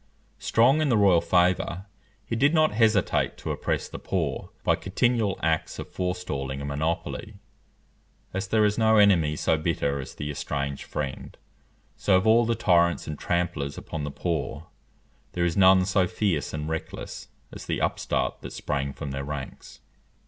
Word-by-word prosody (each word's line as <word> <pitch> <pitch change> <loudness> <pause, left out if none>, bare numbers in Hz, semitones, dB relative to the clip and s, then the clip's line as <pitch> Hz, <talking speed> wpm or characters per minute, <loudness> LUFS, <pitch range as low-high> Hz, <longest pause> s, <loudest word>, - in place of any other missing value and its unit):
Strong 130 +7 +3
in 155 - +1
the 120 - +3
royal 95 -5 +5
favour, 90 +1 +1 0.4
he 115 - -3
did 140 +7 +3
not 155 -1 +4
hesitate 110 -2 +2
to - - -4
oppress - - -2
the - - -8
poor - - -2
by - - +3
continual 110 0 0
acts 80 -1 0
of - - -6
forestalling 85 -8 -3
and 70 - -5
monopoly. 80 +7 -3 1.0
As 95 +2 -2
there 110 +1 +3
is 105 +2 +1
no 110 0 +4
enemy 90 -7 +4
so 80 +1 +1
bitter 70 -3 -1
as 65 - -8
the 75 0 -4
estranged 70 -1 -4
friend, 70 -3 -5 0.6
so 100 - +2
of 95 - 0
all 115 +2 +5
the 115 0 +1
tyrants 85 -5 +2
and 75 - -4
tramplers 85 -5 -1
upon 80 -2 -5
the 75 - -3
poor, 80 -1 -3 0.7
there 85 -1 0
is 85 -2 0
none 95 -1 +6
so 95 -1 +2
fierce 85 -8 -1
and 75 0 -4
reckless 80 0 -6 0.3
as - - -9
the - - -1
upstart - - -1
that - - -8
sprang 70 -1 -2
from 70 - -6
their 70 +1 -4
ranks. 70 -1 -7
90 Hz, 165 wpm, -26 LUFS, 75-105 Hz, 1.0 s, none